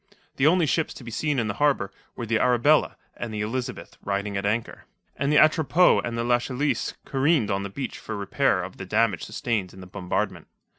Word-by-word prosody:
The 135 - +4
only 175 +1 +4
ships 160 +2 0
to - - -10
be 120 - -8
seen 150 +5 -1
in 115 -3 0
the 100 - -1
harbour 135 -10 +2 0.2
were 120 - -4
the 115 0 +1
Arabella 125 +5 +3 0.2
and 120 - -5
the 105 -1 -3
Elizabeth 120 +4 -4
riding 100 0 -2
at 100 +1 -1
anchor, 110 +2 -2 0.3
and 140 +2 0
the 150 - +4
Atropos 155 +3 +5
and 115 0 -3
the 115 - 0
Lachesis 125 +4 0
careened 135 -5 +2
on 95 0 0
the 100 - -4
beach 135 +7 -5
for 110 - -6
repair 100 0 +1
of 90 - -8
the - - -6
damage 110 -3 +2
sustained 110 -4 -2
in - - -12
the 90 - -9
bombardment. 90 -1 -3
115 Hz, 205 wpm, -25 LUFS, 100-140 Hz, 0.3 s, Atropos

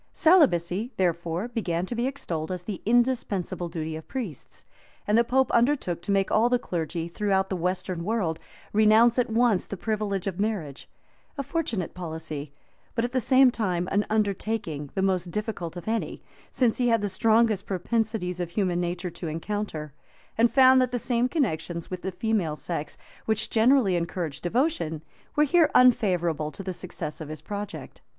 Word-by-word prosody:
Celibacy, 230 - +3
therefore, 170 +2 0
began 185 -8 -2
to 215 - -5
be 240 +2 0
extolled 170 - -4
as 180 -1 -4
the 195 -1 -5
indispensable 230 -7 +1
duty 160 -1 -4
of 160 - -9
priests; 220 - -7 0.4
and 210 - +2
the 235 - +5
pope 265 +2 +2
undertook 235 - +1
to 200 - -3
make 195 -1 +1
all 225 +3 +4
the 245 - +3
clergy, 170 -5 -3
throughout 190 +2 0
the - - 0
western 180 0 -2
world, 180 -6 -1 0.3
renounce 220 +3 +5
at 245 - +1
once 225 -3 +2
the 200 - -5
privilege 205 -2 -2
of 195 -2 -3
marriage; 195 -10 -3 0.5
a 275 - -2
fortunate 255 - -2
policy, 160 -4 -6 0.4
but 230 0 +1
at 245 - -4
the 260 - +1
same 260 +2 +5
time 180 -7 -1
an 205 +1 +2
undertaking 200 -8 -1
the 190 - 0
most 185 -2 +1
difficult 190 -4 -4
of 175 - -9
any, 225 0 -2 0.3
since 245 -4 +1
he 245 - +1
had 230 -2 +3
the - - +1
strongest 220 +1 +2
propensities 200 -1 -1
of 175 -2 -2
human 180 -2 0
nature 175 +1 -3
to 170 - -6
encounter, 160 -2 -4 0.4
and 230 +1 +3
found 260 -1 +6
that 250 -1 +1
the 245 - 0
same 245 +1 0
connections 170 - -2
with 185 -1 -4
the 190 - -3
female 185 -5 -1
sex, 155 -1 -5 0.3
which 220 -1 0
generally 230 -4 +4
encourage 170 -3 -3
devotion, 175 - -1 0.3
were 300 - +4
here 320 +2 +4
unfavorable 175 -11 +3
to 195 - -8
the 185 -1 -3
success 170 -4 -6
of 155 - -7
his 155 -1 -7
project. 205 +1 -7
195 Hz, 170 wpm, -26 LUFS, 170-235 Hz, 0.5 s, found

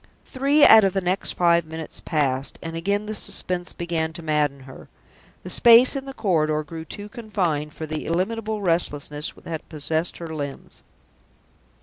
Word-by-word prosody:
Three 280 +3 +3
out 220 -1 +9
of 195 -2 +2
the 195 - 0
next 180 +2 -1
five 170 -1 +3
minutes 160 0 -7
passed, 140 -4 -1
and 165 0 -5
again 200 +5 -1
the 215 - -4
suspense 180 -3 -2
began 165 -2 -3
to 170 0 -9
madden 150 -3 0
her. 130 0 -13 0.6
The - - -6
space 240 +3 +6
in 270 -1 -4
the 270 - -7
corridor 155 -7 +1
grew 160 +2 -8
too 205 +4 -7
confined 185 -10 -2
for 160 - -5
the 155 0 -5
illimitable 210 +5 -2
restlessness 150 -4 -1
that 160 -2 -6
possessed 160 +2 -2
her 165 -2 -7
limbs. 145 -3 -7
170 Hz, 160 wpm, -23 LUFS, 155-205 Hz, 0.6 s, out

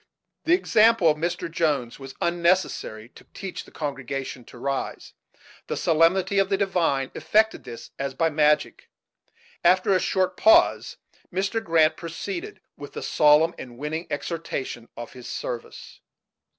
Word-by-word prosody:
The 340 - +5
example 225 - +4
of 150 - -3
Mr. 170 +2 -2
Jones 150 -8 -1
was 135 0 -10
unnecessary 170 -10 0
to - - -17
teach 195 -2 -6
the - - -17
congregation 135 -3 -5
to - - -14
rise; 135 +2 -4 0.5
the - - -3
solemnity 180 +4 +3
of 195 -1 +2
the 195 - +1
divine 170 -9 0
effected 220 +1 +1
this 115 - -9
as 135 -1 -3
by 165 - +2
magic. 150 - +1 0.7
After 185 +2 +4
a 185 - +3
short 185 0 0
pause, 335 +1 +4 0.3
Mr. 195 +5 -1
Grant 165 -3 +3
proceeded 350 - -6
with - - -10
the - - -6
solemn 150 +2 +4
and 120 -2 -9
winning 155 +5 -4
exhortation 135 -8 -4
of 120 0 -8
his 125 -1 -10
service. 120 -1 -7
165 Hz, 140 wpm, -25 LUFS, 135-190 Hz, 0.7 s, The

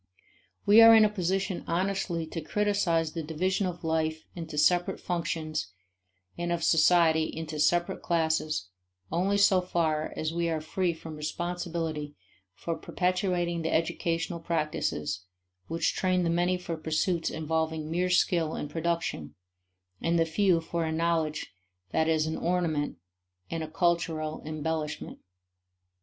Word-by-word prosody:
We 210 +3 +8
are 225 0 +10
in 220 -1 +7
a - - +3
position 190 -1 -1
honestly 180 -1 -1
to 160 +1 -5
criticize 175 -3 +1
the 165 - -4
division 185 +5 0
of 175 -1 -6
life 160 -1 -1
into 165 -3 -6
separate 175 +4 +3
functions 165 -3 -2 0.7
and 175 0 -1
of 170 -1 -1
society 160 -1 +4
into 155 -1 -5
separate 175 +3 +2
classes 160 - 0 0.4
only 190 +5 +1
so 195 -2 +5
far 160 -4 0
as 155 +1 -2
we 170 0 0
are 160 -1 0
free 175 +3 -1
from 160 -1 -9
responsibility 165 -2 -3 0.4
for 165 +8 -3
perpetuating 180 -2 -1
the 160 - -1
educational 165 +1 -1
practices 150 - -2 0.4
which 165 0 0
train 185 -1 +1
the 170 - +1
many 175 +2 +2
for 170 -2 -5
pursuits 160 +2 0
involving 160 0 -2
mere 180 +2 +1
skill 175 -3 +2
in 145 - -4
production, 165 - -2 0.7
and 170 +1 +1
the 165 - +3
few 175 +1 +2
for 165 +1 -2
a 160 - -1
knowledge 160 - -1 0.4
that 160 - +2
is 160 -1 +2
an 160 0 -2
ornament 170 -4 0 0.5
and 165 -1 -2
a 155 - -5
cultural 160 -2 0
embellishment. 155 -1 -3
165 Hz, 140 wpm, -28 LUFS, 160-175 Hz, 0.7 s, are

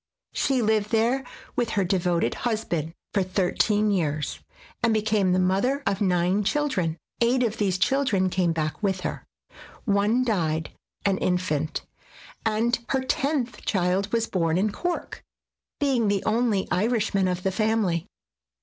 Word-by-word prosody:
She 265 -3 +1
lived 215 -1 +1
there 235 +4 +2 0.3
with 240 -2 0
her 200 - +4
devoted 180 -2 +1
husband 175 - -2 0.2
for 200 - +2
thir 185 0 0
teen 210 0 +2
years, 155 -6 -1 0.4
and 225 0 +3
became 215 -3 +2
the 180 - +3
mother 195 +10 +1
of 200 +1 0
nine 185 +1 +2
children. 195 - 0 0.2
Eight 250 +2 +3
of 225 -2 -1
these 190 -3 +1
children 200 -5 +2
came 180 -2 +1
back 155 +1 -2
with 190 -3 0
her, - - -4 0.6
one 210 +3 +2
died 160 -9 0 0.3
(an 195 -1 +2
infant), 160 -4 -1 0.6
and 225 +2 +1
her 265 -1 +1
tenth 270 -2 -1
child 190 +1 0
was 230 -1 +1
born 165 -5 0
in 205 +3 +1
Cork, 350 - -4 0.6
being 265 -6 +2
the 200 -1 +1
only 220 -3 +1
Irishman 205 -1 +1
of 180 0 -2
the 190 - +1
family. 215 -5 0
200 Hz, 145 wpm, -25 LUFS, 180-230 Hz, 0.6 s, her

